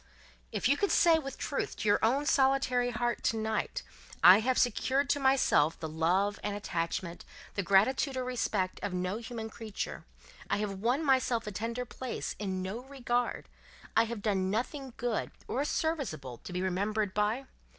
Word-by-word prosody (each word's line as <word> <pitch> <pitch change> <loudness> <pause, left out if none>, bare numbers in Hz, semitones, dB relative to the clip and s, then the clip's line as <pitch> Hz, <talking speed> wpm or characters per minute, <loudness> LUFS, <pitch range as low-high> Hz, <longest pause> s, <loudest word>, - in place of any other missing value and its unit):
"If - - 0
you 280 +2 +3
could 405 - +1
say, 330 -2 +5
with 275 -3 -7
truth, 280 - -3
to 215 - -3
your 205 - +4
own 265 +6 +2
solitary 265 -4 +3
heart, 240 0 -1
to 225 - +2
night, 220 - -2 0.4
'I 185 +3 +10
have 250 +3 +1
secured 265 +4 +2
to 285 - +1
myself 265 - +3
the 160 - -4
love 180 +6 +1
and 205 -1 -2
attachment, 170 -2 -3 0.3
the 200 - -1
gratitude 220 - +3
or 255 - -1
respect, 220 -7 -1
of 195 -3 -3
no 180 +3 -1
human 230 -1 -6
creature; 220 -2 -6 0.5
I - - +2
have 200 -2 -3
won 250 +9 +1
myself 255 -4 +2
a 210 - -4
tender 230 +5 -3
place 255 +1 -5
in 190 -3 -2
no 195 +5 -4
regard; 245 -3 -2 0.5
I 225 - +5
have 225 -2 -6
done 190 -3 +1
nothing 255 +5 -3
good 240 -3 -1 0.2
or 270 - 0
serviceable 270 - -2
to - - -6
be 180 +1 -2
remembered 200 +2 0
by! 215 +6 0
225 Hz, 170 wpm, -31 LUFS, 195-260 Hz, 0.5 s, I